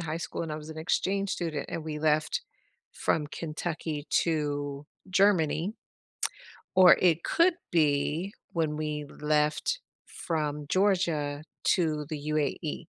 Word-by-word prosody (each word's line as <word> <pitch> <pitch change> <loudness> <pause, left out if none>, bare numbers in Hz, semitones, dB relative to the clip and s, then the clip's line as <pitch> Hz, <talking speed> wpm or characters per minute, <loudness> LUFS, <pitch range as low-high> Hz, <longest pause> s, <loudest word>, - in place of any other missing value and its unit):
high 160 -1 -3
school 170 - -4
and 165 - -4
I - - -3
was 155 +1 -8
an 160 - -7
exchange 195 +4 0
student 165 -6 -2
and 160 - -4
we 150 -1 -4
left 155 0 +2 0.5
from 150 -2 0
Kentucky 155 -1 -4 0.2
to 145 -3 -2 0.2
Germany 190 -1 +3 1.0
or 185 -1 +9
it 170 -2 +3
could 340 +1 +4 0.2
be 155 +3 +1 0.2
when 155 -3 0
we 150 -1 -2 0.2
left 150 - +1 0.3
from 150 -3 -3
Georgia 170 -7 +1 0.2
to 155 -5 +2
the 150 -2 -5
UAE. 150 +2 -1
155 Hz, 125 wpm, -29 LUFS, 150-175 Hz, 1.0 s, or